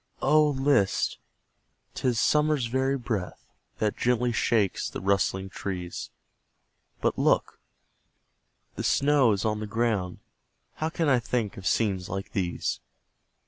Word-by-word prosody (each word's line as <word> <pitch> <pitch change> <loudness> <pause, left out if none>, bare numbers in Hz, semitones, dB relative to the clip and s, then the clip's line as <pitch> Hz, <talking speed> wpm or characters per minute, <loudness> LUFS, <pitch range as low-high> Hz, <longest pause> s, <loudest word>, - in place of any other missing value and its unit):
Oh, 150 +2 +5
list! 135 -7 +1 0.7
'tis 125 -3 0
summer's 150 -2 +2
very 130 +3 0
breath 110 -7 -4 0.3
That 105 -1 0
gently 125 0 +1
shakes 110 -4 +1
the - - -6
rustling 95 0 0
trees 90 -3 -5 0.9
But - - 0
look! - - +1 1.2
the - - -3
snow 140 -4 +3
is 100 +1 -1
on 105 -1 0
the 110 - -4
ground 105 -5 -1 0.6
How 155 - -1
can 165 -1 -1
I 130 -3 +4
think 115 -3 -2
of 95 -1 -5
scenes 95 -4 0
like 95 +1 -5
these? 90 -3 -2
115 Hz, 125 wpm, -27 LUFS, 95-130 Hz, 1.2 s, Oh